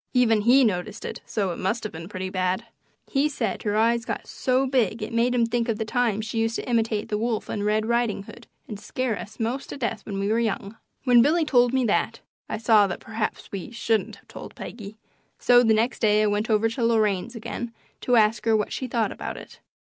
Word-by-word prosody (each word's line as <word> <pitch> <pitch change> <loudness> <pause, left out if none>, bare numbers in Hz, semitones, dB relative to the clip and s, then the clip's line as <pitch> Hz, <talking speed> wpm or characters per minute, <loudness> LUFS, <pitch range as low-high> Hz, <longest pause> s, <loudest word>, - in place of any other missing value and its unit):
Even 225 -4 +4
he 250 +5 +5
noticed 210 0 -1
it, - - -6
so 200 -4 -1
it 170 - -6
must 220 +5 -1
have 215 - -4
been 165 +2 -8
pretty 185 -1 -5
bad. 185 -1 -1 0.5
He 285 +2 +2
said 300 - -2
her 210 -1 -1
eyes 230 +1 +3
got - - -4
so 260 0 0
big 240 -5 0
it - - -6
made 240 +2 +2
him 235 -1 +3
think 235 +1 -1
of 220 - 0
the 220 - -2
times 220 -2 0
she 220 +1 -3
used 225 0 0
to - - -4
imitate 225 -3 0
the 210 -2 -1
wolf 225 -1 -2
in 205 - -2
Red 215 +1 +1
Riding 235 -3 0
Hood 235 +3 -13 0.2
and 210 - -7
scare 240 +2 -2
us 215 +3 -9
'most 240 +4 -2
to - - -6
death 230 -5 -3
when 200 -2 -5
we 200 +1 -1
were 225 +2 +2
young. 215 -2 -2 0.3
When 245 -3 +6
Billy 315 +5 +3
told 245 -4 +4
me 260 -1 +1
that, 230 +1 0 0.3
I - - -2
saw 215 -2 +5
that 180 - -5
perhaps 220 -1 -4
we 195 -3 -5
shouldn't 225 -2 -1
have - - -22
told - - -10
Peggy, 215 -2 -8 0.4
so 245 0 +5
the 225 -2 +3
next 230 +4 0
day 215 -1 +3
I - - +3
went 210 +2 0
over 220 0 +3
to 235 +2 -3
Lorraine's 220 -1 +1
again 235 +1 -5 0.3
to 250 - +2
ask 220 0 +3
her 225 -1 +4
what 210 - -2
she 260 - -3
thought 230 -4 0
about - - -6
it. - - -12
225 Hz, 235 wpm, -25 LUFS, 210-240 Hz, 0.5 s, When